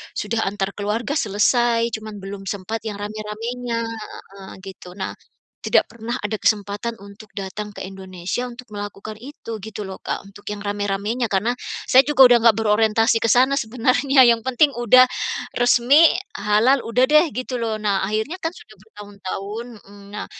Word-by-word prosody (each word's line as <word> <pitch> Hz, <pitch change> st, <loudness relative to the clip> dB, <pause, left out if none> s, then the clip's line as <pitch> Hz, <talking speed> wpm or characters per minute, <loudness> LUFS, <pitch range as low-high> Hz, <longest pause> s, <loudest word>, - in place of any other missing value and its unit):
sudah 230 Hz, -1 st, -1 dB
antar 195 Hz, 0 st, -2 dB
keluarga 210 Hz, +6 st, -3 dB
selesai, 230 Hz, +3 st, +2 dB
cuman 215 Hz, -1 st, -6 dB
belum 195 Hz, 0 st, -7 dB
sempat 200 Hz, +3 st, -4 dB
yang 210 Hz, -, -4 dB
rame-ramenya 225 Hz, +3 st, -4 dB
heeh 210 Hz, -3 st, -9 dB
gitu. 185 Hz, -2 st, -11 dB
Nah, 195 Hz, -, -4 dB, 0.5 s
tidak -, -, +3 dB
pernah 235 Hz, +1 st, -6 dB
ada 210 Hz, +1 st, -2 dB
kesempatan 205 Hz, +2 st, 0 dB
untuk 200 Hz, +1 st, -14 dB
datang 205 Hz, +1 st, -6 dB
ke -, -, -9 dB
Indonesia 190 Hz, +4 st, -5 dB
untuk 245 Hz, 0 st, -10 dB
melakukan 205 Hz, +1 st, -7 dB
itu 235 Hz, -2 st, -8 dB
gitu 215 Hz, +1 st, -8 dB
loh 190 Hz, -1 st, -7 dB
Kak, -, -, -4 dB
untuk 205 Hz, +1 st, -16 dB
yang 210 Hz, -1 st, -5 dB
rame-ramenya 205 Hz, +3 st, -2 dB
karena 225 Hz, +4 st, 0 dB, 0.3 s
saya 260 Hz, +1 st, +7 dB
juga 295 Hz, -2 st, +2 dB
udah 245 Hz, -, +7 dB
enggak 230 Hz, -1 st, +5 dB
berorientasi 220 Hz, +1 st, +3 dB
ke 225 Hz, -, -2 dB
sana 255 Hz, +5 st, +4 dB
sebenarnya 255 Hz, +2 st, +3 dB
yang 230 Hz, 0 st, +1 dB
penting 260 Hz, +4 st, +3 dB
udah 255 Hz, +2 st, +6 dB, 0.5 s
resmi, 245 Hz, +6 st, +5 dB, 0.3 s
halal, 215 Hz, +6 st, +2 dB
udah 250 Hz, +4 st, +2 dB
deh 305 Hz, +2 st, +6 dB
gitu 255 Hz, +1 st, -4 dB
loh. 220 Hz, -2 st, -3 dB
Nah, 200 Hz, -2 st, +1 dB
akhirnya 220 Hz, -, -2 dB
kan 325 Hz, -1 st, -4 dB
sudah 215 Hz, -, -15 dB
bertahun-tahun 205 Hz, +1 st, -7 dB, 0.2 s
hmm, 200 Hz, 0 st, -14 dB
nah, 210 Hz, -, -5 dB
220 Hz, 160 wpm, -21 LUFS, 205-240 Hz, 0.5 s, saya